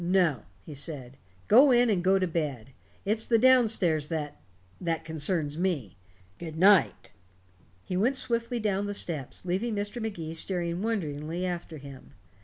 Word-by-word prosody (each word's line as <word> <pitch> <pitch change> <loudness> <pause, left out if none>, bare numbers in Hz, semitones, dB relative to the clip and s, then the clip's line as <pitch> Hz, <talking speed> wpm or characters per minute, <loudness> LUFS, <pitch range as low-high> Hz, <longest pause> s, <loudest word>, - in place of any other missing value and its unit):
"No," 175 - +2 0.2
he 155 - -9
said. 135 -3 -5 0.3
"Go 260 +7 +7
in 245 0 +5
and 180 -4 0
go 190 +1 +4
to 190 - +1
bed. 145 -8 -3 0.3
It's 215 +2 0
the 230 - +4
down 255 0 +6
stairs 165 -9 +1
that 150 -3 -4 0.4
that 165 -2 -2
concerns 160 -1 -1
me. 155 - -1 0.4
Good 160 -2 -7
night." 195 +2 +4 0.7
He 180 - -4
went 235 +9 +2
swiftly 235 -1 -1
down 205 -2 -1
the 205 - -3
steps, 155 -4 -4
leaving 200 +6 -1
Mr. 205 +4 -3
Magee 170 -8 -4
staring 170 +1 -2
wonderingly 170 -5 -2
after 175 -3 -4
him. 140 -2 -12
175 Hz, 155 wpm, -28 LUFS, 155-205 Hz, 0.7 s, Go